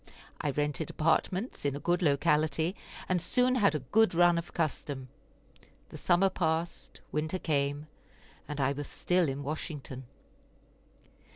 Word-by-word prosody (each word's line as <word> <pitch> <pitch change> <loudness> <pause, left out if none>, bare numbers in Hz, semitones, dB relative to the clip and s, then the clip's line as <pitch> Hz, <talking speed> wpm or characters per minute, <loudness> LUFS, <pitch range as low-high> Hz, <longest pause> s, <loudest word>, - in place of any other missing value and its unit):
I 150 - 0
rented 145 +2 -1
apartments 185 +7 0
in 140 -1 0
a - - -4
good 175 +5 +1
locality, 155 +2 +2 0.3
and 180 -2 +1
soon 250 +7 +2
had 205 -9 +3
a 150 - -1
good 220 -4 +4
run 175 0 +5
of 170 - -8
custom. 140 -5 -3 0.8
The - - -9
summer 185 +2 +3
passed, 165 -1 -2
winter 155 +4 -1
came, 145 -3 0 0.6
and 150 -1 -5
I 135 0 +2
was 145 0 -4
still 180 -3 +1
in 135 +1 -4
Washington. 145 -3 -5
155 Hz, 135 wpm, -30 LUFS, 145-175 Hz, 0.8 s, run